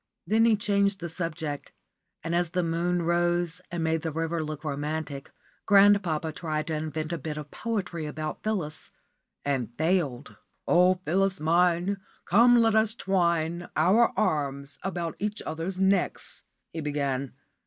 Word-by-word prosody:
Then 225 Hz, +1 st, +3 dB
he 230 Hz, -1 st, +5 dB
changed 200 Hz, -1 st, +1 dB
the 170 Hz, -, -5 dB
subject, 160 Hz, -3 st, -4 dB, 0.5 s
and 165 Hz, +1 st, -2 dB
as 175 Hz, -1 st, +1 dB
the 180 Hz, +1 st, 0 dB
moon 170 Hz, +1 st, 0 dB
rose 175 Hz, 0 st, +1 dB
and 170 Hz, -1 st, -3 dB
made 160 Hz, 0 st, +1 dB
the 160 Hz, -, -3 dB
river 165 Hz, +1 st, -2 dB
look 155 Hz, 0 st, -6 dB
romantic, 150 Hz, -1 st, -4 dB, 0.4 s
grandpapa 195 Hz, -6 st, +4 dB
tried 155 Hz, -1 st, -3 dB
to 160 Hz, -, -3 dB
invent 155 Hz, +1 st, -3 dB
a 170 Hz, -, -3 dB
bit 150 Hz, +2 st, -5 dB
of 150 Hz, -1 st, -7 dB
poetry 180 Hz, -8 st, -3 dB
about 155 Hz, +1 st, -5 dB
Phyllis, 180 Hz, -8 st, -3 dB, 0.5 s
and 130 Hz, -5 st, -1 dB
failed. 160 Hz, -6 st, 0 dB, 0.3 s
"Oh, 180 Hz, +1 st, +5 dB
Phyllis 190 Hz, +4 st, +1 dB
mine, 175 Hz, +4 st, +2 dB, 0.3 s
come 235 Hz, +5 st, +6 dB
let 225 Hz, -1 st, +3 dB
us 220 Hz, 0 st, +3 dB
twine 170 Hz, -4 st, 0 dB
our 195 Hz, +9 st, +4 dB
arms 140 Hz, -6 st, -1 dB
about 175 Hz, -4 st, -3 dB
each 210 Hz, +1 st, -2 dB
other's 165 Hz, +4 st, -4 dB
necks," 190 Hz, 0 st, 0 dB, 0.3 s
he 160 Hz, -, -4 dB
began. 140 Hz, -3 st, -2 dB
170 Hz, 145 wpm, -27 LUFS, 155-190 Hz, 0.5 s, come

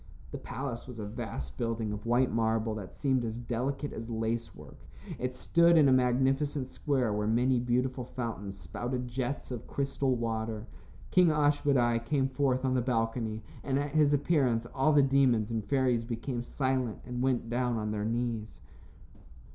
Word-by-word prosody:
The -, -, -5 dB
palace 120 Hz, -4 st, -5 dB
was 125 Hz, -2 st, -8 dB
a 105 Hz, -, -4 dB
vast 105 Hz, -, -6 dB
building 115 Hz, -2 st, -1 dB
of 105 Hz, +2 st, -6 dB
white 125 Hz, +2 st, +3 dB
marble 110 Hz, 0 st, +1 dB
that 100 Hz, -4 st, -6 dB
seemed 130 Hz, -3 st, +1 dB
as 115 Hz, 0 st, -3 dB
delicate 125 Hz, +4 st, -3 dB
as 115 Hz, +1 st, -6 dB
lace 115 Hz, 0 st, -2 dB
work. -, -, -13 dB, 0.4 s
It 125 Hz, 0 st, -2 dB
stood 170 Hz, +5 st, +4 dB
in 150 Hz, -3 st, +6 dB
a -, -, +5 dB
magnificent 130 Hz, +3 st, +2 dB
square 130 Hz, -5 st, 0 dB
where 105 Hz, 0 st, -1 dB
many 125 Hz, +3 st, +3 dB
beautiful 125 Hz, +1 st, 0 dB
fountains 110 Hz, -5 st, -5 dB
spouted 120 Hz, +8 st, -4 dB
jets 130 Hz, +3 st, -3 dB
of 120 Hz, -2 st, -6 dB
crystal 135 Hz, -1 st, 0 dB
water. 110 Hz, -2 st, -3 dB, 0.5 s
King 180 Hz, -1 st, +6 dB
Ashmedai 145 Hz, -6 st, +2 dB
came 135 Hz, +2 st, +1 dB
forth 130 Hz, -1 st, +1 dB
on 130 Hz, -, +2 dB
the 130 Hz, -, +2 dB
balcony, 115 Hz, -2 st, -1 dB, 0.2 s
and 135 Hz, -1 st, 0 dB
at 145 Hz, 0 st, -1 dB
his 150 Hz, -1 st, +4 dB
appearance 135 Hz, -6 st, +2 dB
all 135 Hz, +3 st, +3 dB
the 145 Hz, -2 st, +6 dB
demons 130 Hz, -5 st, +3 dB
and 110 Hz, -2 st, -1 dB
fairies 130 Hz, -2 st, +1 dB
became 120 Hz, +1 st, -3 dB
silent 130 Hz, -2 st, -1 dB
and 125 Hz, 0 st, -4 dB
went 130 Hz, -3 st, +1 dB
down 120 Hz, 0 st, 0 dB
on 105 Hz, -1 st, -2 dB
their 105 Hz, -1 st, -2 dB
knees. 115 Hz, -1 st, -2 dB
125 Hz, 170 wpm, -30 LUFS, 115-135 Hz, 0.5 s, in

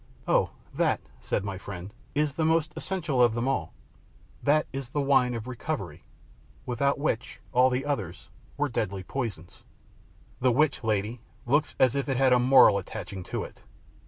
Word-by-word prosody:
"Oh, -, -, +3 dB, 0.2 s
that," -, -, +1 dB, 0.2 s
said -, -, -2 dB
my 100 Hz, -2 st, -4 dB
friend, 95 Hz, 0 st, -8 dB, 0.2 s
"is 150 Hz, -1 st, +1 dB
the 160 Hz, -, -1 dB
most 160 Hz, 0 st, +2 dB
essential 160 Hz, -9 st, -1 dB
of 120 Hz, -2 st, +4 dB
them 120 Hz, +2 st, -1 dB
all 135 Hz, -, -1 dB, 0.7 s
that 150 Hz, +1 st, +3 dB
is 135 Hz, -2 st, -5 dB
the 145 Hz, -, -2 dB
wine 135 Hz, -3 st, +3 dB
of 115 Hz, -1 st, -5 dB
recovery, 125 Hz, -2 st, -5 dB, 0.6 s
without 140 Hz, +3 st, +1 dB
which 140 Hz, -5 st, -2 dB
all 125 Hz, 0 st, +5 dB
the 130 Hz, +2 st, -1 dB
others 105 Hz, -, -3 dB, 0.3 s
were 145 Hz, 0 st, +1 dB
deadly 100 Hz, -6 st, -2 dB
poisons." 95 Hz, -8 st, -5 dB, 0.8 s
"The 125 Hz, 0 st, +3 dB
which, 145 Hz, +2 st, +2 dB
lady, 110 Hz, +2 st, -1 dB, 0.2 s
looks 140 Hz, +2 st, +1 dB
as 130 Hz, -1 st, +4 dB
if 140 Hz, 0 st, -1 dB
it 135 Hz, -, +1 dB
had 130 Hz, -1 st, +4 dB
a 125 Hz, -, +5 dB
moral 125 Hz, -5 st, +6 dB
attaching 95 Hz, 0 st, -7 dB
to -, -, -3 dB
it." -, -, -11 dB
125 Hz, 165 wpm, -27 LUFS, 110-140 Hz, 0.8 s, moral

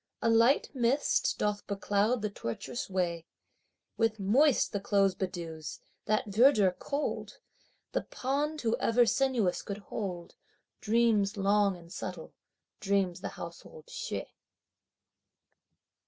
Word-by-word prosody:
A 230 Hz, -, +2 dB
light 230 Hz, +4 st, +4 dB
mist 260 Hz, +2 st, +1 dB
doth 210 Hz, 0 st, -1 dB
becloud 205 Hz, +3 st, 0 dB
the 210 Hz, -, 0 dB
tortuous 120 Hz, -, -5 dB
way! 170 Hz, -3 st, -1 dB, 0.7 s
With 225 Hz, -1 st, +1 dB
moist 250 Hz, +8 st, +3 dB
the 205 Hz, -, -2 dB
clothes 195 Hz, -1 st, +2 dB
bedews, 170 Hz, -5 st, -5 dB, 0.3 s
that 215 Hz, 0 st, +1 dB
verdure 210 Hz, -2 st, +5 dB
cold! 280 Hz, +10 st, -4 dB, 0.5 s
The -, -, 0 dB
pond 295 Hz, +4 st, -2 dB
who 230 Hz, -1 st, +1 dB
ever 240 Hz, +1 st, +4 dB
sinuous 235 Hz, -6 st, +1 dB
could 200 Hz, -, -5 dB
hold? 190 Hz, -4 st, -6 dB, 0.5 s
Dreams 220 Hz, -2 st, +2 dB
long 200 Hz, -1 st, +2 dB
and 170 Hz, 0 st, -13 dB
subtle, 180 Hz, -3 st, -6 dB, 0.5 s
dream 195 Hz, -2 st, +1 dB
the -, -, -6 dB
household 485 Hz, 0 st, -10 dB
Hsieh. -, -, -4 dB
205 Hz, 115 wpm, -30 LUFS, 190-235 Hz, 0.7 s, verdure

